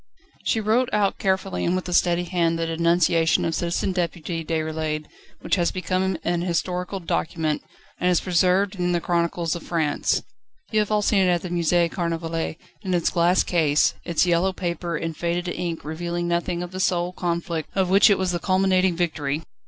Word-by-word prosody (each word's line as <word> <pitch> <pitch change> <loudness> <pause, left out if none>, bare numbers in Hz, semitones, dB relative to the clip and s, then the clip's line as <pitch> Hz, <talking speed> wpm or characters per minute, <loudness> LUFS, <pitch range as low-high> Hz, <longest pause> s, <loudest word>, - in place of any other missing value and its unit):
She 225 - +1
wrote 225 +4 +2
out 205 -2 +1
carefully 190 0 0
and 175 - +1
with 185 0 -3
a 180 - -3
steady 175 0 +3
hand 170 -2 0
the 165 - -1
denunciation 165 0 +2
of 165 - -1
Citizen 175 +3 -1
Deputy 170 -2 -3
Déroulède 155 -1 -2 0.4
which - - 0
has 175 -1 +2
become 185 0 -1
an 175 0 0
historical 180 +2 -2
document, 160 -3 -1 0.4
and 180 - +2
is 180 - +3
preserved 185 +2 +2
in 180 0 0
the 175 - +2
chronicles 170 -1 0
of 170 - -6
France. 160 -4 0 0.5
You 215 - +2
have 210 - 0
all 210 -1 +1
seen 205 - +3
it 185 - +3
at 175 -1 +1
the 180 - -4
Musée 170 0 +2
Carnavalet 165 -2 -2 0.2
in 185 -4 -1
its 170 - +1
glass 175 +2 +3
case, 155 -4 +2
its 170 +1 +1
yellow 175 +2 +2
paper 170 -2 -3
and 165 0 -4
faded 175 +2 -2
ink 170 -3 -4
revealing 170 +2 -3
nothing 170 0 -1
of 180 - -7
the 185 - -6
soul 180 -1 0
conflict 170 -2 -3
of 190 -2 +1
which 200 +4 +7
it 200 - +4
was 185 -1 0
the 175 - -1
culminating 185 -1 +2
victory. 155 -3 -1
175 Hz, 185 wpm, -24 LUFS, 165-185 Hz, 0.5 s, which